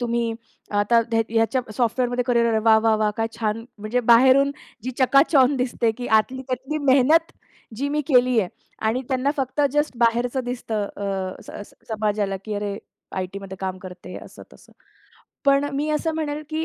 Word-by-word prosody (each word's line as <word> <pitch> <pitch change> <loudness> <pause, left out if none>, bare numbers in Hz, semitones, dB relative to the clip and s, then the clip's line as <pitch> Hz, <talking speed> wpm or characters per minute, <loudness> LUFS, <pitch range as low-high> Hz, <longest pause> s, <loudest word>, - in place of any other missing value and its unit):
तुम्ही 235 -1 -1 0.4
आता 205 +3 +3
ह्या 225 0 +3
ह्याच्या 225 +3 +1 0.2
सॉफ्टवेअरमध्ये 245 +1 0
करिअर, 235 -2 +2
वाह! 220 0 +5
वाह! 220 0 +2
वाह! 215 -1 +1
काय 225 - +1
छान 225 0 -2
म्हणजे 215 +4 -1
बाहेरून 260 +4 +6 0.3
जी 255 - -2
चकाचौंध 275 +1 +4
दिसते 245 -2 0
की 245 - -4
आतली 260 +4 -3
त्यातली 260 +4 -3
मेहनत 305 +6 +4 0.4
जी 280 +5 -2
मी 300 +1 0
केली 250 -3 +4
आहे 185 - -2 0.4
आणि 225 +4 +1
त्यांना 265 +1 +1
फक्त 270 +1 -2
जस्ट 295 -3 0
बाहेरचं 240 +2 +1
दिसतं 235 -3 -3
अ, 195 -2 -4
स - - -12 0.2
स - - -23
समाजाला 210 -2 -1
की 215 - -4
अरे 205 -1 -3 0.4
आयटीमध्ये 190 +1 -5
काम 190 -1 -3
करते 180 -1 -10
असं - - -13
तसं. - - -19 0.7
पण 275 0 +4
अ, - - -5
मी 290 +2 -1
असं 305 +2 0
म्हणेल 305 -1 -3
की 315 +1 -1
240 Hz, 170 wpm, -23 LUFS, 215-265 Hz, 0.7 s, बाहेरून